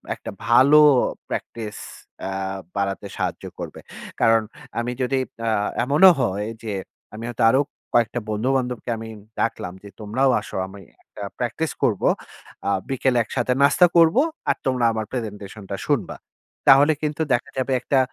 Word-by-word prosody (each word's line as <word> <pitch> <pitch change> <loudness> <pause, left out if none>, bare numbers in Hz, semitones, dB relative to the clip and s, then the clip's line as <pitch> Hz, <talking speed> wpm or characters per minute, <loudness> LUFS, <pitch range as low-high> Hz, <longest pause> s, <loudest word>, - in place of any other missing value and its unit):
একটা - - -8 0.2
ভালো 135 +6 +7 0.5
practice 110 -3 -5 0.5
আ - - -3 0.5
বাড়াতে 100 0 -2
সাহায্য - - -3 0.2
করবে। - - -7 0.4
কারণ 115 0 +5 0.4
আমি 120 +1 -2
যদি 130 +1 +1 0.3
আ - - +2 0.3
এমনও 150 +9 +7
হয় 100 +2 -1 0.2
যে 110 -2 -3 0.4
আমি 110 +2 -7
হয়তো 120 -1 -2
আরো 130 - +4 0.3
কয়েকটা 120 0 +2
বন্ধু-বান্ধবকে 125 +2 -1
আমি 115 - -7 0.3
ডাকলাম 90 -5 -2
যে 100 - -10
তোমরাও 115 +6 +1
আসো। - - -10
আমি 100 +1 -11 0.2
একটা 105 - -13 0.2
প্র্যাকটিস 125 +6 -2
করব, 105 -5 +2 0.7
আ - - +2 0.2
বিকেলে 130 -1 +1
একসাথে 120 +3 -1
নাস্তা 175 +5 +6
করব 165 -1 +6 0.3
আর - - +3
তোমরা 125 -2 +1
আমার 110 -1 -3
প্রেজেন্টেশনটা 105 -4 -6
শুনবা। - - 0 0.5
তাহলে 140 +3 +7
কিন্তু 150 +1 -1
দেখা 120 - 0
যাবে 130 +1 -1
একটা 135 +1 +2
120 Hz, 140 wpm, -23 LUFS, 110-135 Hz, 0.7 s, ভালো